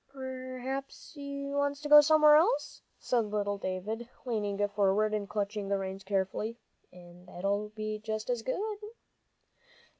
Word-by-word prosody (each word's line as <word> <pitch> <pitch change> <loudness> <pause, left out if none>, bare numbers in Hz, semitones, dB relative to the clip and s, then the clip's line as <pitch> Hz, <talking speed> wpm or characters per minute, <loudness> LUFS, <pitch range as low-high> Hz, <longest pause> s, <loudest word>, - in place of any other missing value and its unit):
"P'r'aps 260 0 -6
he 280 -1 -6
wants 285 0 -1
to 300 - -4
go 295 0 +10
somewhere 305 0 +6
else," 375 +11 +2 0.2
said 235 -3 0
little 205 -1 -2
David, 210 +6 -4 0.2
leaning 205 -4 0
forward 205 +1 +2
and 205 -2 -2
clutching 205 0 -2
the 200 - +2
reins 190 0 -5
carefully, 200 +3 -1 0.3
"and 180 0 -15
that'll 200 +4 -2
be 215 0 -3
just 215 0 -4
as 245 -2 -1
good." 410 - -2
215 Hz, 140 wpm, -31 LUFS, 200-275 Hz, 0.3 s, go